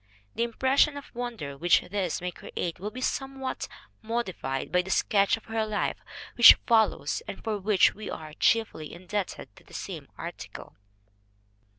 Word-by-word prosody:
The - - -3
impression 265 +5 +2
of 285 - -10
wonder 235 - -5
which 175 +5 +4
this 185 -4 -2
may 180 0 -2
create 175 0 -5
will 205 +3 -4
be 255 +4 -8
somewhat 270 0 -3 0.3
modified 190 - -3
by 180 - +4
the 185 - -9
sketch 200 +2 +3
of 225 - -16
her 225 -1 -1
life 215 -1 -1 0.4
which 240 - +10
follows, 225 - +2
and - - -7
for 215 -2 -2
which 200 0 +4
we 215 0 -7
are 155 -1 -7
chiefly 220 -6 +1
indebted 185 +2 -5
to - - -16
the - - -14
same - - -6
article. - - -8
215 Hz, 160 wpm, -28 LUFS, 180-235 Hz, 0.4 s, which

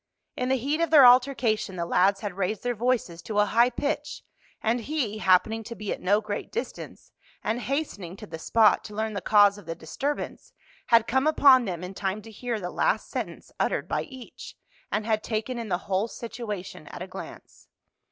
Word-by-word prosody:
In 250 0 -2
the 265 - +3
heat 285 +6 -1
of 335 - +1
their 290 -4 +8
altercation 245 -5 +4
the 170 -1 -2
lads 195 +3 +2
had 205 -3 -4
raised 195 +2 -2
their 245 0 0
voices 230 -7 -1
to 210 +4 -5
a 210 - +5
high 235 +4 +4
pitch, 285 +5 -3 0.4
and 230 +2 +1
he, 235 -4 -2
happening 215 +4 +3
to 235 - -7
be 210 -2 -3
at - - -9
no 205 +4 +3
great 210 -1 -5
distance, 470 - -6 0.3
and 225 +3 -1
hastening 235 - -3
to - - -9
the 160 0 -8
spot 220 +5 +4
to 210 - -9
learn 220 0 -2
the 200 - -3
cause 205 -1 +5
of 190 - -16
the 165 - -4
disturbance, 285 - -4 0.3
had 230 -1 +5
come 265 +4 +1
upon 275 -5 +6
them 180 -3 -4
in 180 +1 -6
time 195 +2 -3
to 225 - -11
hear 235 +1 -3
the 180 -2 -5
last - - 0
sentence - - -5
uttered - - 0
by - - -1
each, 260 -5 -11 0.4
and 215 0 -1
had 220 -1 0
taken 230 +3 -3
in 230 -2 -5
the 175 - +1
whole 195 +3 0
situation 210 -9 -7
at 175 - -7
a - - -8
glance. 185 - -11
220 Hz, 200 wpm, -26 LUFS, 195-250 Hz, 0.4 s, their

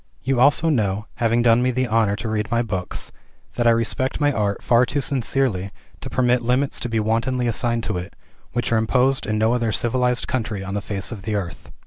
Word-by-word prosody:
You 130 -1 0
also 145 +5 +4
know, 105 -7 0
having 115 0 +2
done 115 0 +5
me 125 - +2
the 130 +1 0
honor 110 -3 +2
to 110 - -5
read 110 0 -2
my 120 0 +1
books, 95 -5 -4 0.4
that 120 -1 +1
I - - +7
respect 115 +3 0
my 145 -1 +3
art 100 -3 -1
far 120 +1 +4
too 135 +4 -1
sincerely 130 -7 0 0.3
to - - -7
permit 125 -1 +2
limits 125 +4 0
to 120 - -4
be 115 -1 0
wantonly 115 +4 0
assigned 115 0 0
to 90 - -2
it, 90 - -9 0.4
which 120 -1 -2
are 115 - +3
imposed 125 +4 +1
in 105 0 0
no 110 +2 +2
other 120 -2 0
civilized 125 +2 0
country 110 -5 -2
on 100 0 -5
the 105 - -2
face 100 -1 -4
of 110 -4 -6
the 105 +2 -3
earth. 90 -4 -5
115 Hz, 215 wpm, -22 LUFS, 110-125 Hz, 0.4 s, I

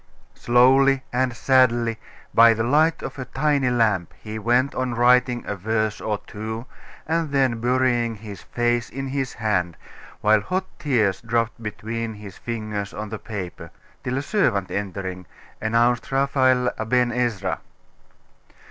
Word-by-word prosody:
Slowly 130 +2 +4
and 125 -1 0
sadly, 120 -3 +3 0.3
by 115 0 +7
the 110 - -1
light 155 +6 +2
of - - -6
a 130 - -4
tiny 140 -1 +1
lamp, 110 -8 +1
he 110 0 -7
went 120 +5 +2
on 130 -2 -2
writing 125 0 +3
a 105 - -3
verse 110 +2 -1
or 105 -1 -1
two, 110 +2 -6 0.4
and 165 0 0
then 130 -5 +1
burying 120 -2 +1
his 105 -1 -9
face 120 0 -1
in 135 +3 -5
his 135 -1 -2
hand, 90 -6 -1 0.4
while 110 0 +4
hot 185 - -2
tears 115 -11 +1
dropped 115 0 -1
between 110 +1 -4
his 105 -2 -10
fingers 110 -3 -5
on 105 +1 -5
the 110 -1 -5
paper; 95 -6 -7 0.3
till 125 +1 -2
a 135 - -2
servant 120 - +1
entering, 95 -3 -4 0.3
announced 115 +3 +1
Raphael 130 -2 +2
Aben 120 +2 +1
Ezra. 115 -6 -1
115 Hz, 140 wpm, -23 LUFS, 110-130 Hz, 0.4 s, by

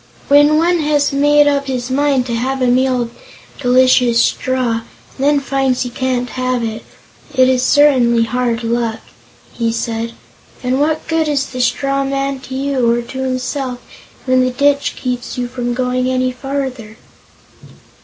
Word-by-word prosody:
"When 290 +2 +5
one 345 +2 +2
has 295 -2 +1
made 290 +1 +4
up 280 -1 +1
his 255 -1 -3
mind 275 -2 +1
to 240 - -4
have 260 +3 -1
a 255 - +1
meal 250 0 +2
of 235 - -8 0.5
delicious 250 -2 +4
straw, 255 -1 0 0.4
and 270 - -5
then 290 0 +3
finds 270 -2 0
he 245 - -6
can't 250 -1 -2
have 255 -1 -1
it, 225 0 -4 0.5
it 255 -1 +5
is 255 -1 +2
certainly 255 -4 +4
hard 240 0 -1
luck," 230 -1 -1 0.5
he 230 -1 -1
said. 230 0 -3 0.5
"And 255 +1 0
what 310 +1 0
good 325 -1 0
is 280 -2 0
the 255 -1 -5
straw 275 +3 0
man 275 0 -2
to 260 0 -8
you, 265 -3 +1
or 240 0 0
to 260 +2 -8
himself, 255 0 -3 0.5
when 255 -1 +3
the 255 - +1
ditch 280 +2 +1
keeps 250 -2 -4
you 245 -1 -2
from 245 -1 -3
going 255 0 0
any 255 0 0
further?" 255 -4 -5
255 Hz, 165 wpm, -16 LUFS, 245-275 Hz, 0.5 s, When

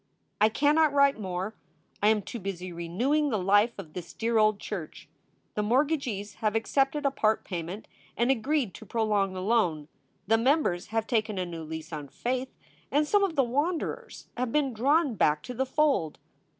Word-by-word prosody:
I 215 - +6
cannot 295 +6 +3
write 280 -3 +4
more! 190 +1 -3 0.5
I 205 - +4
am 215 -1 +3
too 235 - -6
busy 185 -2 -5
renewing 240 - 0
the 220 - 0
life 205 +5 +3
of 165 -6 -9
this 175 -2 -7
dear 230 0 +1
old 215 -1 +3
church. 180 -7 -7 0.5
The 210 - -1
mortgagees 240 -4 0
have 215 -1 +1
accepted 270 +6 +1
a 275 - +3
part 220 -4 +1
payment 180 +3 -6 0.3
and 240 +3 +3
agreed 265 -2 0
to 220 - -11
prolong 210 -3 +1
the 185 0 -5
loan. 175 -9 +1 0.4
The 225 +2 +3
members 235 - +1
have 225 0 -1
taken 215 -4 0
a 185 - -1
new 165 -2 -7
lease 160 +1 -7
on 150 -2 -5
faith 250 - -3 0.4
and 295 +1 +2
some 410 +3 +3
of 370 -5 0
the 275 - +4
wanderers 290 +8 -2
have 250 -1 -2
been 280 -2 +1
drawn 280 +5 +2
back 150 -6 +2
to 250 - -6
the 265 +2 -1
fold. 265 - +1
220 Hz, 180 wpm, -28 LUFS, 185-270 Hz, 0.5 s, I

